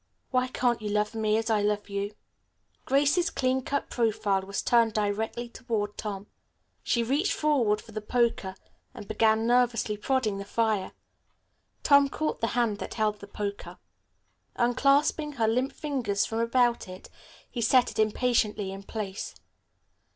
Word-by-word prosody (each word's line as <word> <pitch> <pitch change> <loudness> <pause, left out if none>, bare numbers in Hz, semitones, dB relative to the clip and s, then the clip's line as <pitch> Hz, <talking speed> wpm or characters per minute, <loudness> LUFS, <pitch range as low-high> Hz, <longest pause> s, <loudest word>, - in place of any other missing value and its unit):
Why 255 0 +2
can't 245 -2 0
you 210 - -3
love 210 +1 0
me 215 -1 +1
as 225 0 -1
I 215 -1 +3
love 205 0 0
you?" 200 +1 -4 0.7
Grace's 290 +6 +3
clean 260 0 0
cut 280 +2 -3
profile 215 -4 +1
was 195 +1 -4
turned 230 -2 +3
directly 215 +3 -1
toward 225 -4 -3
Tom. 200 -2 -5 0.6
She 235 - +1
reached 285 - +1
forward 250 -9 +2
for 225 - -14
the 215 0 -5
poker 220 -4 0 0.4
and 205 - -9
began 220 0 +2
nervously 240 -3 +2
prodding 215 -3 0
the - - -4
fire. 215 -2 -1 0.9
Tom 280 -1 +5
caught 310 +2 -3
the 230 - +2
hand 225 -4 +1
that - - -6
held 215 -2 0
the 200 - -10
poker. 200 0 -5 0.8
Unclasping 280 +5 +2
her 230 -5 +1
limp 250 +5 +1
fingers 260 -9 -1
from 225 - -3
about 240 0 +2
it, 185 0 -10 0.4
he 240 - -4
set 245 +2 +4
it - - -8
impatiently 215 -2 +1
in 195 0 -7
place. 200 -1 -5
225 Hz, 150 wpm, -27 LUFS, 210-250 Hz, 0.9 s, Tom